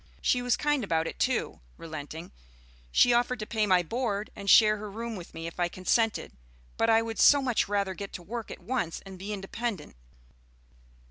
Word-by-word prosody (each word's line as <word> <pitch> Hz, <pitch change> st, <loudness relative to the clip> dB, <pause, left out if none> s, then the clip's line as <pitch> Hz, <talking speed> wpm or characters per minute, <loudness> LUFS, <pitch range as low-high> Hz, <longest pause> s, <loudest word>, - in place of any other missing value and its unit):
She 250 Hz, -, +1 dB
was 245 Hz, -1 st, +1 dB
kind 295 Hz, -3 st, +1 dB
about 165 Hz, -4 st, 0 dB
it, -, -, -6 dB
too -, -, 0 dB
" -, -, -30 dB
relenting; 160 Hz, +1 st, -8 dB, 0.6 s
"she 245 Hz, -, +5 dB
offered 245 Hz, +1 st, +2 dB
to 215 Hz, -, -5 dB
pay 215 Hz, -1 st, 0 dB
my 185 Hz, -2 st, +4 dB
board 215 Hz, +1 st, -2 dB
and 200 Hz, -2 st, -4 dB
share 215 Hz, 0 st, +7 dB
her 210 Hz, 0 st, -7 dB
room 230 Hz, +2 st, -5 dB
with 175 Hz, -4 st, -10 dB
me 165 Hz, 0 st, -6 dB
if 165 Hz, +1 st, -7 dB
I 175 Hz, -, +2 dB
consented; 220 Hz, +6 st, 0 dB, 0.4 s
but 225 Hz, -, +1 dB
I 225 Hz, 0 st, +5 dB
would 225 Hz, -1 st, -5 dB
so 290 Hz, -, +7 dB
much 255 Hz, -4 st, 0 dB
rather 200 Hz, -1 st, 0 dB
get 200 Hz, +1 st, -7 dB
to 175 Hz, -, -7 dB
work 230 Hz, +4 st, -6 dB
at -, -, -9 dB
once 235 Hz, -10 st, -2 dB
and 190 Hz, -1 st, -10 dB
be 200 Hz, +3 st, -5 dB
independent. 200 Hz, -, -4 dB
210 Hz, 200 wpm, -28 LUFS, 180-235 Hz, 0.6 s, share